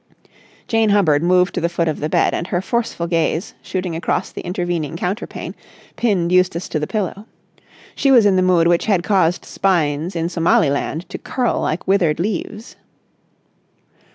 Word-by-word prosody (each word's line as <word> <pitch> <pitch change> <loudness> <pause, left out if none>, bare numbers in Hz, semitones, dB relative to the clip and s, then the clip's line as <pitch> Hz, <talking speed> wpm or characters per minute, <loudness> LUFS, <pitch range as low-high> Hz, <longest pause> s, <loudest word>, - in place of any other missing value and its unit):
Jane 225 -1 +2
Hubbard 170 -8 +3
moved 180 +2 +3
to - - -2
the 170 - +1
foot 170 -1 -1
of 155 - -2
the 150 - -2
bed, - - +2
and 170 - -3
her 175 - -1
forceful 230 -3 -2
gaze, 165 +1 -1
shooting 180 -3 -4
across 170 +3 -2
the - - -7
intervening 175 -3 -3
counterpane, 185 +6 -4 0.4
pinned 185 -7 0
Eustace 185 -1 +2
to 155 - -1
the 150 - -3
pillow. 210 0 -3 0.7
She 275 - +1
was 245 -5 +6
in 200 -2 +4
the 185 - +3
mood 180 -2 +3
which 175 +3 +2
had 190 -5 +2
caused 180 -4 +1
spines 170 -2 0
in 165 0 -1
Somaliland 165 -1 +1
to - - -6
curl 250 -2 -1
like 160 - -2
withered 180 -6 +2
leaves. 210 +4 -4
180 Hz, 165 wpm, -19 LUFS, 165-195 Hz, 0.7 s, was